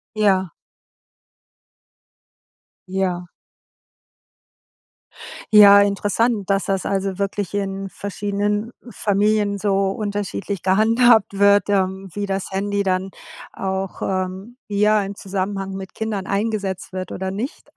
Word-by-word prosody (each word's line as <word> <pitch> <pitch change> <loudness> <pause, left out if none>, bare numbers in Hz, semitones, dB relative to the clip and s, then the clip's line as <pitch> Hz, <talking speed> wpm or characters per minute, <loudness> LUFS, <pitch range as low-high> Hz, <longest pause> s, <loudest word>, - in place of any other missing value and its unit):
Ja. 190 -5 +2 2.4
Ja. 185 -2 -1 2.3
Ja, 200 -1 +9
interessant, 205 +1 0
dass 195 0 +1
das 195 -1 -1
also 195 -1 -2
wirklich 200 -1 -2
in 195 -1 -3
verschiedenen 205 +2 -2 0.2
Familien 205 -1 +1
so 195 -1 +1
unterschiedlich 200 -2 -4
gehandhabt 220 +2 +4
wird, 200 0 +4
ähm, 190 -1 0
wie 205 0 -3
das 195 -1 -3
Handy 200 +1 -1
dann 190 0 0 0.4
auch, 190 0 -4
ähm, 190 +5 -3
ja 210 +1 +2
im 200 +1 -6
Zusammenhang 195 0 -3
mit 190 -1 -8
Kindern 215 -3 -3
eingesetzt 200 -2 -2
wird 185 0 -5
oder 190 0 -3
nicht 220 +8 -6
200 Hz, 105 wpm, -21 LUFS, 190-205 Hz, 2.4 s, Ja